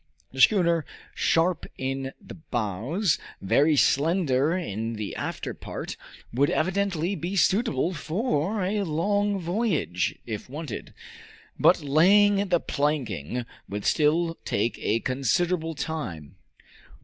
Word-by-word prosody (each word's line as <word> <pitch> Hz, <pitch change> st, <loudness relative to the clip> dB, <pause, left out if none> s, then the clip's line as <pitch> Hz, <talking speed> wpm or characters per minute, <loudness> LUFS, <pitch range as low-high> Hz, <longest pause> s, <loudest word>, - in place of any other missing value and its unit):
The 130 Hz, -, -2 dB
schooner, 170 Hz, -, +4 dB, 0.3 s
sharp 170 Hz, +2 st, +1 dB
in 135 Hz, 0 st, -3 dB
the 195 Hz, -, -11 dB
bows, 130 Hz, -, -1 dB, 0.2 s
very 145 Hz, +10 st, +3 dB
slender 150 Hz, +1 st, +2 dB
in 115 Hz, -, -3 dB
the 105 Hz, -2 st, -5 dB
after -, -, -4 dB
part, -, -, -6 dB, 0.4 s
would 140 Hz, +4 st, +3 dB
evidently 185 Hz, 0 st, 0 dB
be 185 Hz, 0 st, -4 dB
suitable 185 Hz, -, +2 dB
for 185 Hz, -, -1 dB
a 205 Hz, +3 st, 0 dB
long 200 Hz, +4 st, 0 dB
voyage, 175 Hz, -, -1 dB
if 110 Hz, +1 st, -6 dB
wanted; 145 Hz, -3 st, -7 dB, 0.6 s
but -, -, +5 dB
laying 200 Hz, +7 st, +4 dB
the 175 Hz, -2 st, +3 dB
planking 125 Hz, -, -2 dB, 0.2 s
would 105 Hz, 0 st, -4 dB
still 165 Hz, +2 st, +2 dB
take 110 Hz, +4 st, -1 dB
a 115 Hz, +2 st, +1 dB
considerable 160 Hz, +6 st, 0 dB
time. 120 Hz, -, -5 dB
155 Hz, 115 wpm, -26 LUFS, 130-185 Hz, 0.6 s, but